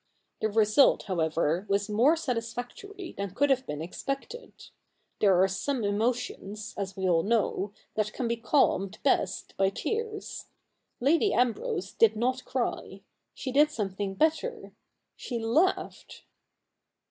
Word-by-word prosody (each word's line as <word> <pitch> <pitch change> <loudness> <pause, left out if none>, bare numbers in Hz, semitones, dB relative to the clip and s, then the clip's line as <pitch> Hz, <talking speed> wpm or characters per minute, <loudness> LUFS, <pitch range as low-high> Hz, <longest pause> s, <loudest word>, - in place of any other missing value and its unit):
The 220 - +1
result, 220 +5 +4
however, 165 0 0
was 200 +1 +1
more 235 +9 +4
satisfactory 255 - -5
than 200 -1 -5
could 285 0 +3
have 260 -1 +1
been 150 +1 -4
expected. 275 - -5 0.7
There 195 -4 +4
are - - +4
some 230 +6 -2
emotions, 215 0 -2
as 195 -1 -5
we 190 -1 0
all 170 -2 +4
know, 205 -1 0 0.2
that 215 -1 -1
can 245 - -3
be 235 - 0
calmed 230 -5 +1
best 190 - 0
by 195 0 +3
tears. 435 - -4 0.5
Lady 330 - +3
Ambrose 220 -6 0
did 220 -1 +4
not 255 +3 0
cry. - - -3 0.3
She 260 - -4
did 295 +3 +5
some 215 -9 -2
thing 195 0 -3
better 320 - 0 0.2
— - - -54
she 245 - -5
laughed. 255 +12 0
225 Hz, 135 wpm, -28 LUFS, 195-275 Hz, 0.7 s, did